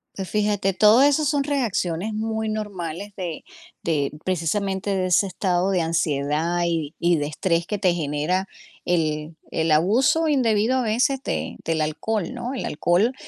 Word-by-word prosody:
Pues 190 Hz, -2 st, -5 dB
fíjate, 205 Hz, -2 st, +1 dB
todo 215 Hz, +6 st, +6 dB
eso 290 Hz, +2 st, +3 dB
son 285 Hz, -1 st, +1 dB
reacciones 220 Hz, -, -1 dB
muy 220 Hz, 0 st, -2 dB
normales 200 Hz, -3 st, -4 dB
de 175 Hz, -4 st, -5 dB, 0.4 s
de, 145 Hz, -4 st, 0 dB
precisamente, 190 Hz, +3 st, -1 dB
de 185 Hz, -1 st, 0 dB
ese 185 Hz, +2 st, +3 dB
estado 185 Hz, 0 st, 0 dB
de 180 Hz, -3 st, +2 dB
ansiedad 160 Hz, +1 st, 0 dB
y 165 Hz, -3 st, -1 dB
y 170 Hz, -1 st, +3 dB
de 145 Hz, 0 st, -1 dB
estrés 170 Hz, +2 st, -1 dB
que 210 Hz, -, -2 dB
te 185 Hz, -3 st, +3 dB
genera 160 Hz, +4 st, -1 dB, 0.4 s
el 155 Hz, -2 st, -1 dB, 0.2 s
el 160 Hz, 0 st, 0 dB
abuso 240 Hz, -, +3 dB
indebido 240 Hz, -3 st, +2 dB
a -, -, +1 dB
veces 250 Hz, +5 st, +1 dB
de -, -, -3 dB
del 160 Hz, -1 st, 0 dB
alcohol, 165 Hz, +5 st, -2 dB
¿no? 245 Hz, +2 st, -4 dB
El 265 Hz, -, -4 dB
alcohol 175 Hz, -, +1 dB
185 Hz, 160 wpm, -23 LUFS, 165-215 Hz, 0.4 s, todo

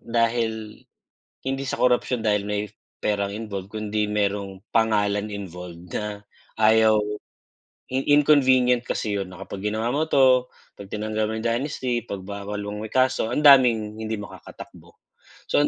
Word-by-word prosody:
dahil 115 Hz, -2 st, -1 dB, 0.7 s
hindi 135 Hz, +1 st, -1 dB
sa 135 Hz, -, -3 dB
korupsyon 125 Hz, 0 st, +2 dB
dahil 105 Hz, -1 st, +2 dB
may 105 Hz, 0 st, -2 dB, 0.3 s
perang 100 Hz, -1 st, -1 dB
involved 100 Hz, -2 st, -6 dB
kundi 105 Hz, -1 st, -2 dB
merong 100 Hz, -2 st, -1 dB, 0.2 s
pangalan 105 Hz, -2 st, +2 dB
involved 90 Hz, -3 st, -8 dB
na 105 Hz, -1 st, -4 dB, 0.3 s
ayaw 110 Hz, 0 st, +5 dB, 0.9 s
in 130 Hz, +1 st, -1 dB
inconvenient 130 Hz, -4 st, +4 dB
kasi 105 Hz, -4 st, -2 dB
yun 95 Hz, -2 st, -4 dB
na 90 Hz, -, -12 dB
kapag 95 Hz, -, -7 dB
ginawa 110 Hz, +2 st, -1 dB
mo 155 Hz, -, +2 dB
'to, 130 Hz, -4 st, +3 dB, 0.2 s
'pag 100 Hz, -1 st, -12 dB
tinanggal 110 Hz, 0 st, -2 dB
mo 110 Hz, -, -3 dB
yung 115 Hz, -, -2 dB
dynasty, 125 Hz, -1 st, -1 dB
'pag 95 Hz, -2 st, -7 dB
bawal 100 Hz, 0 st, -5 dB
mo 105 Hz, +1 st, -5 dB
may 110 Hz, -, -7 dB
kaso, 130 Hz, -3 st, +1 dB
ang -, -, 0 dB
daming 125 Hz, -7 st, +5 dB
hindi 110 Hz, -1 st, -4 dB
makakatakbo. 105 Hz, -, -12 dB, 0.5 s
So -, -, +4 dB
ang 145 Hz, -, +3 dB
110 Hz, 150 wpm, -24 LUFS, 105-125 Hz, 0.9 s, ayaw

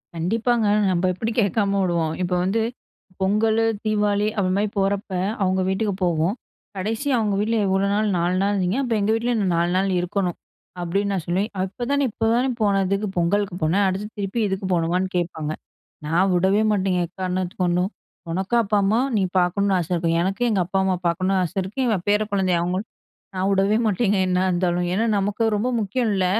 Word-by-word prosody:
கண்டிப்பாங்க. 220 Hz, +6 st, +1 dB, 0.2 s
நம்ம 180 Hz, +1 st, +1 dB
எப்படி 220 Hz, +5 st, -3 dB
கேட்காம 200 Hz, 0 st, +1 dB
விடுவோம். 170 Hz, -3 st, 0 dB
இப்போ 180 Hz, 0 st, 0 dB
வந்து 200 Hz, +5 st, +1 dB, 0.6 s
பொங்கலு, 220 Hz, +3 st, +2 dB, 0.2 s
தீபாவளி 210 Hz, -1 st, +1 dB
அப்படி 185 Hz, -2 st, +1 dB
மாதிரி 210 Hz, +1 st, +1 dB
போறப்ப, 200 Hz, +1 st, 0 dB, 0.3 s
அவங்க 190 Hz, 0 st, +1 dB
வீட்டுக்கு 200 Hz, +2 st, 0 dB
போவோம். 170 Hz, +3 st, +1 dB, 0.4 s
கடைசியா 225 Hz, +9 st, -1 dB
அவங்க 210 Hz, -3 st, 0 dB
வீட்டில 225 Hz, +2 st, +1 dB
எவ்வளோ 195 Hz, +1 st, +1 dB
நாள், 215 Hz, +1 st, +1 dB
4 175 Hz, +2 st, +1 dB
நாள் 200 Hz, +1 st, +1 dB
இருந்திங்க. 190 Hz, +2 st, 0 dB
அப்போ 240 Hz, -3 st, -1 dB
எங்கள் 205 Hz, +2 st, +1 dB
வீட்டிலையும் 225 Hz, -6 st, 0 dB
4 170 Hz, +1 st, +1 dB
நாள் 195 Hz, +1 st, +1 dB
இருக்கணும் 180 Hz, 0 st, -2 dB, 0.4 s
அப்படின்னு 195 Hz, +4 st, -1 dB
நான் 185 Hz, -4 st, -2 dB
சொல்லுவேன். 190 Hz, +5 st, 0 dB
அப்போதானே, 245 Hz, +9 st, -1 dB
இப்போதானே 230 Hz, +4 st, +1 dB
போனதுக்கு 200 Hz, 0 st, +1 dB
பொங்கலுக்கு 190 Hz, +2 st, +1 dB
போன. 155 Hz, +2 st, +2 dB
அடுத்து 195 Hz, +3 st, -2 dB
திருப்பி 200 Hz, +3 st, -2 dB
இதுக்கு 190 Hz, 0 st, -3 dB
போகணுமான்னு 175 Hz, +2 st, 0 dB
கேட்பாங்க. 160 Hz, -3 st, -2 dB, 0.6 s
நான் 175 Hz, +5 st, +2 dB
வுடவே 190 Hz, +4 st, +3 dB
மாட்டேங்க, 190 Hz, -3 st, +1 dB
எக்காரணத்துக்கு 185 Hz, 0 st, -3 dB
கொண்டும். 180 Hz, +1 st, +1 dB, 0.4 s
உனக்கு 190 Hz, +6 st, -1 dB
அப்பா 210 Hz, 0 st, 0 dB
அம்மா 210 Hz, +4 st, +2 dB, 0.2 s
நீ -, -, +2 dB, 0.2 s
பாக்கணும்னு 190 Hz, +2 st, +1 dB
ஆசை 170 Hz, 0 st, -4 dB
இருக்கும். 165 Hz, -1 st, +1 dB
எனக்கும் 195 Hz, +7 st, 0 dB
எங்க 205 Hz, -4 st, +1 dB
அப்பா 190 Hz, +2 st, -1 dB
அம்மா 190 Hz, -1 st, +1 dB
பாக்கணும்னு 185 Hz, +3 st, +1 dB
ஆசை 180 Hz, +2 st, -5 dB
இருக்கு. 195 Hz, +8 st, -7 dB
இவ 220 Hz, -, +2 dB
பேர 210 Hz, +1 st, +3 dB
குழந்தை 190 Hz, -2 st, +1 dB
அவங்களும். 185 Hz, +5 st, -2 dB, 0.5 s
நான் 185 Hz, +1 st, 0 dB
வுடவே 195 Hz, +2 st, +2 dB
மாட்டேங்க 205 Hz, 0 st, +1 dB
என்னா 180 Hz, 0 st, +1 dB
இருந்தாலும். 175 Hz, 0 st, 0 dB
ஏன்னா, 220 Hz, +4 st, +1 dB
நமக்கு 205 Hz, +3 st, -1 dB
ரொம்ப 220 Hz, +5 st, 0 dB
முக்கியம் 220 Hz, +4 st, -1 dB
இல்ல. 190 Hz, -1 st, +1 dB
195 Hz, 170 wpm, -22 LUFS, 180-210 Hz, 0.6 s, வுடவே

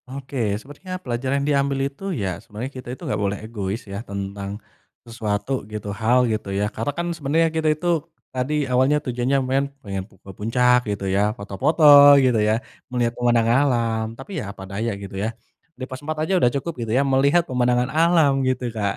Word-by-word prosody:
Oke, 130 Hz, -6 st, -2 dB
sebenarnya 145 Hz, -, -8 dB
pelajaran 130 Hz, +3 st, -1 dB
diambil 140 Hz, -1 st, +1 dB
itu 140 Hz, +6 st, -7 dB, 0.2 s
ya, 95 Hz, -3 st, -3 dB
sebenarnya 115 Hz, +5 st, -7 dB
kita 130 Hz, -2 st, -9 dB
itu -, -, -27 dB
gak -, -, -1 dB
boleh 100 Hz, 0 st, 0 dB
egois 105 Hz, -1 st, -4 dB
ya, 100 Hz, +1 st, -6 dB
tentang 100 Hz, -1 st, -5 dB, 0.5 s
sesuatu 115 Hz, +2 st, -2 dB
gitu, 105 Hz, -1 st, -5 dB
hal, 120 Hz, +4 st, +3 dB
gitu, 110 Hz, -3 st, -2 dB
ya. 100 Hz, +1 st, 0 dB
Karena 115 Hz, +5 st, -3 dB
kan 170 Hz, 0 st, -1 dB
sebenarnya 160 Hz, +1 st, +1 dB
kita 160 Hz, -1 st, +1 dB
itu, 155 Hz, +3 st, -1 dB, 0.5 s
tadi 140 Hz, +3 st, -1 dB
awalnya, 130 Hz, +3 st, +3 dB
tujuannya 125 Hz, +2 st, 0 dB
main 135 Hz, +2 st, +1 dB, 0.2 s
pengen 95 Hz, -2 st, -3 dB
pu 95 Hz, -, -23 dB
ke 95 Hz, -, -12 dB
puncak 125 Hz, +4 st, +3 dB
gitu 100 Hz, -1 st, -3 dB
ya, 95 Hz, +1 st, +1 dB, 0.2 s
foto-foto 130 Hz, -, -1 dB, 0.3 s
gitu 130 Hz, -4 st, +3 dB
ya, 105 Hz, +1 st, +3 dB, 0.4 s
melihat 120 Hz, -2 st, 0 dB
pemandangan 120 Hz, -2 st, +2 dB, 0.2 s
alam. 115 Hz, -3 st, 0 dB
Tapi 135 Hz, +9 st, -10 dB
ya -, -, -5 dB
apa 100 Hz, -1 st, -10 dB
daya 105 Hz, +4 st, -3 dB
gitu 100 Hz, -1 st, -9 dB
ya, 110 Hz, -, 0 dB, 0.5 s
di 130 Hz, -, -7 dB
pos 130 Hz, 0 st, -7 dB
4 155 Hz, +1 st, -4 dB
aja 190 Hz, -, -1 dB
udah 120 Hz, -, +5 dB
cukup 165 Hz, +5 st, -2 dB
gitu 115 Hz, -2 st, -3 dB
ya, 140 Hz, -, +4 dB
melihat 140 Hz, +5 st, +3 dB
pemandangan 125 Hz, 0 st, +1 dB
alam, 160 Hz, -4 st, +4 dB
gitu, 125 Hz, -2 st, -2 dB
Kak, 100 Hz, -3 st, -1 dB
125 Hz, 185 wpm, -22 LUFS, 105-140 Hz, 0.5 s, udah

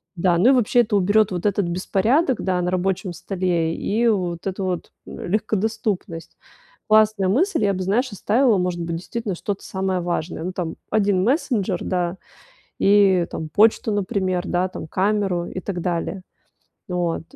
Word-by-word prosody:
Да, 175 Hz, 0 st, +2 dB
ну, 200 Hz, +9 st, +5 dB
и -, -, +7 dB
вообще 245 Hz, -1 st, +4 dB
это 220 Hz, -2 st, -1 dB
уберет 205 Hz, +2 st, +3 dB
вот 180 Hz, 0 st, -4 dB
этот 200 Hz, -1 st, +1 dB
беспорядок, 215 Hz, -, +1 dB
да, 185 Hz, -1 st, 0 dB
на 180 Hz, -, -1 dB
рабочем 185 Hz, 0 st, -1 dB
столе 175 Hz, -2 st, -1 dB
и 230 Hz, +3 st, 0 dB
вот 180 Hz, -6 st, -1 dB
эту 190 Hz, 0 st, -3 dB
вот 180 Hz, -2 st, -3 dB
легкодоступность. 210 Hz, -3 st, -3 dB, 0.5 s
Классная 215 Hz, -2 st, +4 dB
мысль, 265 Hz, -, +2 dB
я 200 Hz, -, +2 dB
бы, 185 Hz, -, -3 dB
знаешь, 230 Hz, +7 st, 0 dB
оставила, 220 Hz, +3 st, +2 dB
может 180 Hz, -1 st, -1 dB
быть, 165 Hz, 0 st, -3 dB
действительно, 210 Hz, +2 st, -4 dB
что-то 200 Hz, +3 st, -4 dB
самое 190 Hz, -1 st, -2 dB
важное, 170 Hz, -1 st, -3 dB
ну, 185 Hz, +2 st, -4 dB
там, 170 Hz, -3 st, -4 dB
1 200 Hz, -3 st, +2 dB
мессенджер, 220 Hz, -, 0 dB
да, 180 Hz, -1 st, -1 dB, 0.6 s
и, 195 Hz, -3 st, +4 dB
там, 160 Hz, -, -5 dB
почту, 215 Hz, +4 st, +3 dB
например, 185 Hz, -2 st, -1 dB
да, 180 Hz, +1 st, 0 dB
там, 170 Hz, -, -8 dB
камеру 195 Hz, -2 st, 0 dB
и 185 Hz, -, -6 dB
так 185 Hz, -2 st, -4 dB
далее. 175 Hz, +2 st, -2 dB, 0.7 s
Вот. 175 Hz, -3 st, -1 dB
190 Hz, 160 wpm, -22 LUFS, 180-215 Hz, 0.7 s, и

